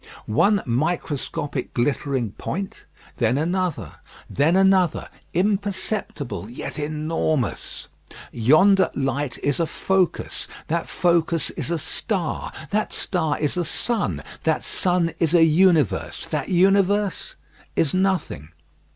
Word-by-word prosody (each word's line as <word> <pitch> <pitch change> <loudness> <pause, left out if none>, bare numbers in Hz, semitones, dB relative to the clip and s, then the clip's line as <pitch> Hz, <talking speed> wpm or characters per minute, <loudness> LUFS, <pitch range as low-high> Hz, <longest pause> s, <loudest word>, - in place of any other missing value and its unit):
One 200 - +2
microscopic 145 0 -2
glittering 130 -2 0
point; 195 - -5 0.3
then 120 +2 +2
another; 175 +1 -2 0.3
then 155 +5 +2
another; 190 -3 +3 0.2
imperceptible, 195 - -2
yet 125 - -6
enormous. 155 -3 -2 0.4
Yonder 185 - +4
light 135 0 -1
is 145 +2 0
a 165 - +1
focus; 185 -2 -1 0.2
that 170 +1 -1
focus 170 -3 +1
is - - -3
a 170 - 0
star; 170 +3 -2 0.2
that 215 +1 0
star 160 -6 0
is 150 +2 -1
a 175 - +1
sun; 230 +5 0 0.2
that 160 -1 0
sun 175 -3 +1
is 165 0 +2
a 165 - +7
universe; 165 - +2
that - - -2
universe 195 +2 +2 0.4
is 155 - +1
nothing. 185 - 0
165 Hz, 110 wpm, -23 LUFS, 145-190 Hz, 0.4 s, a